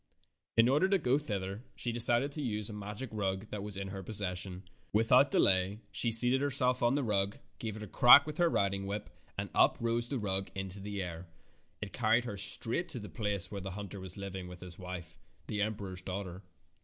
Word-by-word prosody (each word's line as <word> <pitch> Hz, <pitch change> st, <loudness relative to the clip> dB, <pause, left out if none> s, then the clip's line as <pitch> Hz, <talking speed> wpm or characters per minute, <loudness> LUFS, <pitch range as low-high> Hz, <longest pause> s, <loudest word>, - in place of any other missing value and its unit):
In 115 Hz, +1 st, +6 dB
order 150 Hz, +9 st, +3 dB
to 195 Hz, -, +4 dB
go 135 Hz, -4 st, +2 dB
thither 100 Hz, -6 st, -4 dB
she 120 Hz, -, -3 dB
decided 120 Hz, +4 st, +3 dB
to 150 Hz, -, -5 dB
use 105 Hz, -4 st, -2 dB
a -, -, -7 dB
magic 105 Hz, +5 st, -6 dB
rug 95 Hz, -1 st, -2 dB
that 105 Hz, -, -4 dB
was 100 Hz, -1 st, -5 dB
in 95 Hz, 0 st, -4 dB
her 95 Hz, 0 st, -6 dB
possession. 95 Hz, -2 st, -4 dB, 0.2 s
Without 125 Hz, +6 st, +5 dB
delay 95 Hz, -1 st, +2 dB
she 115 Hz, -, +1 dB
seated 125 Hz, +4 st, +7 dB
her 145 Hz, -, +1 dB
self 125 Hz, -1 st, +1 dB
on 120 Hz, +2 st, +3 dB
the 145 Hz, -, 0 dB
rug, 100 Hz, -2 st, 0 dB, 0.2 s
gave 110 Hz, -2 st, -4 dB
it 110 Hz, -, -7 dB
a -, -, -7 dB
crack 120 Hz, +5 st, +8 dB
with 155 Hz, +1 st, -7 dB
her 175 Hz, -1 st, +4 dB
riding 100 Hz, -6 st, 0 dB
whip, 105 Hz, +1 st, -5 dB, 0.3 s
and -, -, -4 dB
up -, -, +4 dB
rose 115 Hz, 0 st, -1 dB
the 135 Hz, -, -2 dB
rug 95 Hz, -3 st, 0 dB
into 95 Hz, 0 st, -5 dB
the 100 Hz, 0 st, -4 dB
air. 85 Hz, 0 st, -7 dB, 0.6 s
It 100 Hz, -, -8 dB
carried 115 Hz, +1 st, +2 dB
her 105 Hz, -, -4 dB
straight 115 Hz, -, -1 dB
to 130 Hz, -, -5 dB
the 105 Hz, -, -8 dB
place 105 Hz, -5 st, -3 dB
where 100 Hz, -1 st, -5 dB
the 95 Hz, -, -5 dB
hunter 100 Hz, -1 st, -7 dB
was 95 Hz, 0 st, -8 dB
living 95 Hz, -2 st, -6 dB
with 90 Hz, -1 st, -11 dB
his 90 Hz, -1 st, -7 dB
wife, 90 Hz, -2 st, -8 dB, 0.3 s
the 105 Hz, -, -2 dB
emperor's 100 Hz, -3 st, -3 dB
daughter. 95 Hz, -1 st, -5 dB
105 Hz, 215 wpm, -32 LUFS, 95-120 Hz, 0.6 s, crack